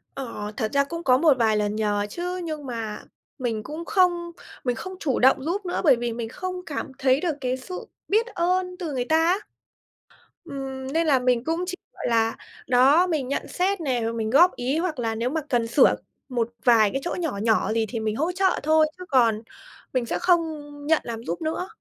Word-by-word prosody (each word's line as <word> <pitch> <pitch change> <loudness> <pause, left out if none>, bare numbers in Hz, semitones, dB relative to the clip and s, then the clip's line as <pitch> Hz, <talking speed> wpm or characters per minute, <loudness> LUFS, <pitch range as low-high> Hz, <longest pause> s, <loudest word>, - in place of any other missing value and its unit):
Ờ, 230 -6 -5
thật 220 - -1
ra 280 - +4
cũng 335 +4 -6
có 255 -4 +5
một 295 -2 +4
vài 220 -3 +3
lần 210 0 0
nhờ 205 -1 0
chứ, 360 - -4
nhưng 310 -3 -5
mà 225 -4 -5 0.4
mình 225 -4 -2
cũng 315 +6 -6
không 350 -3 +2 0.3
mình 245 -2 0
không 375 +10 -7
chủ 270 -6 0
động 265 +1 +4
giúp 370 +5 -2
nữa 355 - -1
bởi 285 -7 +6
vì 235 -1 -3
mình 230 -1 -4
không 365 +6 -5
cảm 285 -1 -4
thấy 265 +1 +3
được 335 -5 0
cái 255 -1 -1
sự 365 +8 -8 0.2
biết 440 +3 +3
ơn 365 -2 0
từ 330 -5 -4
người 250 -2 -1
ta 315 +4 +3
á. 360 +4 +3 1.1
Ừm, 270 -3 -6
nên 330 0 +2
là 275 -4 +4
mình 250 -1 +1
cũng 330 +5 -1
chỉ, 365 - -3 0.2
gọi - - -5
là, 225 -1 +2 0.3
đó, 270 +8 +5
mình 305 -7 -1
nhận 280 - -2
xét 375 +1 0
nè, 260 -6 0
rồi 225 +1 -1
mình 220 -1 -2
góp 340 +9 +5
ý 255 +5 -1
hoặc 330 -4 -2
là 225 -2 -1
nếu 230 +3 -1
mà 315 +3 -1
cần 240 -4 +1
sửa 245 +4 +5 0.3
một 235 -3 -1 0.2
vài 225 -4 +6
cái 270 - -1
chỗ 350 - -2
nhỏ 325 - -2
nhỏ 220 -1 +2
gì 225 0 +1
thì 235 - -3
mình 215 -1 -1
hỗ 320 +8 0
trợ 380 +1 +1
thôi 310 +1 +5
chứ 365 - -8
còn 230 -6 +3 0.5
mình 255 -2 +1
sẽ - - -2
không 355 -2 +4 0.5
nhận 320 0 +3
làm 230 -1 -6
giúp 170 -6 -4
nữa. 320 +3 -2
270 Hz, 220 wpm, -24 LUFS, 235-340 Hz, 1.1 s, bởi